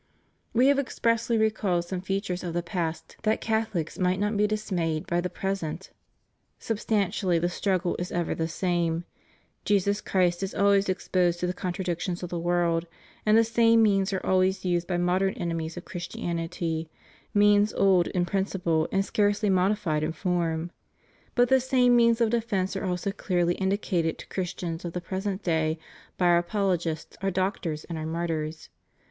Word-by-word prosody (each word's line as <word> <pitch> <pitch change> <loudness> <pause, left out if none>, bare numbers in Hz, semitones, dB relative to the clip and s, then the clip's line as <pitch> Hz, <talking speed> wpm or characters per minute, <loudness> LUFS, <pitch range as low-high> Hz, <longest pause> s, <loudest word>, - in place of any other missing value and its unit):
We 245 +2 +3
have 280 0 +4
expressly 230 -3 0
recalled 210 -5 +1
some 180 +1 -4
features 195 -1 -2
of 170 -2 -4
the 175 - 0
past 170 -2 -4
that 215 0 +1
CathoHcs 220 -7 -2
might 185 0 +1
not 210 +1 0
be 210 +1 +3
dismayed 180 -7 -1
by 175 0 0
the 180 - -2
present. 190 -3 -4 0.7
Substantially 200 -4 0
the 175 +1 +1
struggle 185 -1 0
is 175 - -4
ever 175 -1 -1
the 160 - -2
same: 170 -1 0 0.6
Jesus 200 0 +1
Christ 180 -2 +1
is 195 0 -3
always 200 -1 +3
exposed 180 -2 +1
to 180 - -1
the 180 - -1
contradictions 180 -1 -3
of 180 - -5
the 175 - -2
world, 170 -1 +1 0.4
and 215 +1 +6
the 230 - +6
same 230 0 +4
means 195 -2 +2
are 190 - -3
always 185 +1 +2
used 175 -1 0
by 180 - 0
modem 185 +2 +1
enemies 165 -1 -3
of 175 - -7
Christianity 165 -2 -3 0.4
means 205 0 +4
old 190 -3 +3
in 180 -1 0
principle 175 -4 0
and 195 0 +1
scarcely 205 0 +1
modified 185 -4 +1
in 155 +1 -1
form; 170 -1 -1 0.6
but 245 0 +4
the 265 +2 +5
same 250 -1 +3
means 235 -1 +4
of 230 -2 +2
defence 210 -5 0
are 195 - -3
also 180 +2 -1
clearly 175 -3 0
indicated 190 -4 0
to - - -10
Christians 175 -2 -4
of 170 -1 -5
the 180 - -2
present 190 +2 -4
day 160 -2 +1 0.4
by 180 - +1
our 175 0 +5
apolo 195 +1 +1
gists, 160 -2 -5
our 195 - +1
doctors 185 -4 -2
and 165 -2 -6
our 155 - -4
martyrs. 160 -2 -3
185 Hz, 170 wpm, -27 LUFS, 170-205 Hz, 0.7 s, and